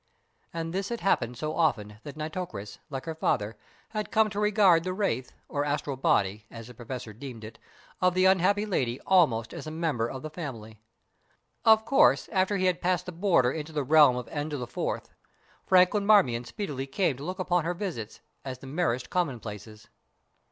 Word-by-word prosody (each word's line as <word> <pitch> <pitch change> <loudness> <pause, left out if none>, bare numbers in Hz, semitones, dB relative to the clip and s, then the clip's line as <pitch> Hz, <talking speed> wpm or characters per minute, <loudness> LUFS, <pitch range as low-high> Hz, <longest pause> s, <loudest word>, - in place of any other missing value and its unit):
And 165 0 -4
this 195 +1 -2
had 235 -1 -4
happened 125 -10 +1
so 155 0 -3
often 105 -11 0
that 145 +3 -9
Nitocris, 155 - -5
like 135 -2 -5
her 165 - -3
father, 110 -8 -1 0.3
had 215 -1 -4
come 220 -1 +3
to 205 - -3
regard 205 -5 +4
the 185 +1 -2
wraith, 160 - -1 0.2
or 145 -1 -1
astral 145 -1 -2
body, 105 -4 +1
as 115 -1 -9
the 125 - -11
Professor 120 -1 -7
deemed 120 -1 -9
it, 110 +1 -10 0.4
of 180 -1 +3
the 185 0 +3
unhappy 190 +2 +3
lady 130 - -1
almost 130 -12 +3
as 160 -3 -7
a - - -3
member 155 -8 -1
of 130 +3 -7
the 155 - -6
family. 115 -10 -8 0.8
Of 220 -1 +6
course, 275 - +4
after 195 0 +1
he 185 - 0
had 180 -2 +1
passed 180 0 0
the 180 - -5
border 170 -8 +2
into 155 +1 -6
the 150 -2 -1
realm 145 -2 +6
of 125 -1 -4
N4, 145 -5 -3 0.6
Franklin 185 +2 +4
Marmion 125 - +4
speedily 140 - -5
came 145 +1 0
to 140 - -9
look 185 +4 -4
upon 180 -2 +1
her 175 +2 -2
visits 170 - -5 0.2
as 130 -2 -5
the 130 - -13
merest 135 -3 -1
commonplaces. 110 - -4
155 Hz, 180 wpm, -28 LUFS, 125-185 Hz, 0.8 s, Of